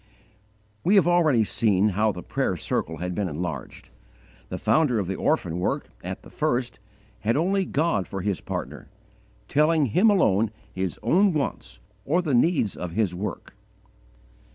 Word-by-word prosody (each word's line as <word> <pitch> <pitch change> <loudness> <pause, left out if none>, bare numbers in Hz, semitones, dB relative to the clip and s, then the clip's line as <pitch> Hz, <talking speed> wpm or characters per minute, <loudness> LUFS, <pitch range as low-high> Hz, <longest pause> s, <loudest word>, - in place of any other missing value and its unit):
We 195 +4 +3
have 185 -5 +5
already 160 -10 +4
seen 105 -1 +2
how 105 +2 +1
the 90 -3 -8
prayer - - -1
circle 80 +1 -2
had 90 +2 -3
been 100 0 -1
enlarged. 85 +2 -6 0.6
The - - -4
founder 150 -7 +2
of 100 - 0
the 95 - -3
orphan 85 -2 0
work, 90 - -2
at - - -6
the - - -14
first, 120 -2 -1 0.4
had 115 +5 0
only 190 +4 +1
God 150 - 0
for 95 - -5
his 100 -1 -2
partner, - - -6 0.6
telling 150 +1 +3
Him 180 - +4
alone 115 - +3 0.2
his 95 -2 -3
own 185 - +3
wants - - -3 0.2
or 175 - +1
the 150 -5 -1
needs 125 - +2
of 90 -2 -6
his 100 -3 0
work. 95 +4 -5
110 Hz, 155 wpm, -25 LUFS, -, 0.6 s, have